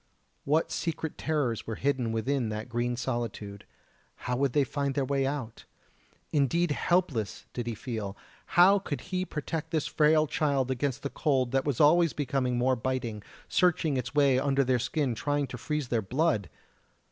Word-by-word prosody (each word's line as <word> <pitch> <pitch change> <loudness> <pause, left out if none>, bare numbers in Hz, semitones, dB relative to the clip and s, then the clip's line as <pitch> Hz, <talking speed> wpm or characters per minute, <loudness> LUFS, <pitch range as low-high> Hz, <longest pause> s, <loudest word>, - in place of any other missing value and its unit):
What 155 +3 +2
secret 160 -2 -3
terrors 145 -8 -1
were 110 - -3
hidden 130 -2 0
within 115 +2 0
that 110 +1 -4
green 120 +1 -1
solitude? 115 -5 -4 0.6
How 125 - 0
would 135 0 +1
they 145 - +4
find 140 0 -2
their 140 - +1
way 135 0 +1
out? 135 -5 -5 0.7
Indeed 155 +4 +2
helpless 145 - 0
did 120 -1 -4
he 115 - -2
feel; 105 -4 -5 0.4
how 195 +3 +7
could 150 -7 -4
he 185 0 0
protect 160 0 -4
this 160 -3 0
frail 155 0 +3
child 140 -3 0
against 130 0 -2
the 140 - -3
cold 130 -6 +1
that 135 0 +1
was 145 -5 -1
always 165 +2 +5
becoming 130 -3 -1
more 130 +2 +2
biting, 120 -3 -3 0.3
searching 165 -5 +2
its 125 +1 -3
way 140 -3 +4
under 140 0 +2
their 130 -1 +2
skin 135 +1 0
trying 145 +5 -1
to 125 -1 -7
freeze 150 -2 -2
their 115 -2 +1
blood! 120 - 0
135 Hz, 170 wpm, -29 LUFS, 120-150 Hz, 0.7 s, how